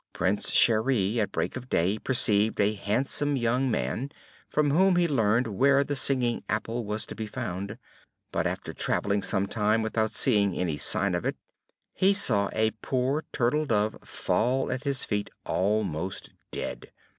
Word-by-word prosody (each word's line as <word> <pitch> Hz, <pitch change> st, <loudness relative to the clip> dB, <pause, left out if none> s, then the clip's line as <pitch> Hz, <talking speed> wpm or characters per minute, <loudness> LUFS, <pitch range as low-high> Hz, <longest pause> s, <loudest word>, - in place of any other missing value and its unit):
Prince 95 Hz, +3 st, 0 dB
Cheri 110 Hz, -2 st, +3 dB
at 100 Hz, -, -2 dB
break -, -, -2 dB
of 130 Hz, 0 st, -8 dB
day 95 Hz, +6 st, +1 dB
perceived 110 Hz, -4 st, +1 dB
a 105 Hz, +1 st, +3 dB
handsome 125 Hz, +8 st, 0 dB
young 125 Hz, +2 st, +1 dB
man, 125 Hz, +3 st, -2 dB, 0.4 s
from 150 Hz, -2 st, +1 dB
whom 185 Hz, +4 st, +4 dB
he 175 Hz, -1 st, +3 dB
learned 115 Hz, -4 st, +2 dB
where 140 Hz, +1 st, +4 dB
the 145 Hz, -, -4 dB
singing 130 Hz, -4 st, +1 dB
apple 115 Hz, +3 st, -2 dB
was 105 Hz, +1 st, -3 dB
to -, -, -7 dB
be 110 Hz, -, -5 dB
found: 100 Hz, -3 st, -5 dB, 0.5 s
but -, -, 0 dB
after -, -, -5 dB
travelling 100 Hz, 0 st, 0 dB
some 95 Hz, 0 st, 0 dB
time 110 Hz, +2 st, 0 dB
without 110 Hz, 0 st, -1 dB
seeing 100 Hz, -7 st, +2 dB
any 85 Hz, -4 st, -1 dB
sign 75 Hz, -, +3 dB
of -, -, -2 dB
it, -, -, -1 dB, 0.6 s
he 195 Hz, +1 st, +3 dB
saw 100 Hz, -, +3 dB
a 110 Hz, 0 st, +1 dB
poor 135 Hz, +4 st, -1 dB
turtle 150 Hz, +6 st, 0 dB
dove 105 Hz, -2 st, +1 dB
fall 125 Hz, +3 st, -1 dB
at 130 Hz, +3 st, -4 dB
his 140 Hz, -2 st, -1 dB
feet 105 Hz, -1 st, -2 dB, 0.2 s
almost 95 Hz, -3 st, -2 dB, 0.2 s
dead. -, -, -6 dB
115 Hz, 160 wpm, -27 LUFS, 105-135 Hz, 0.6 s, whom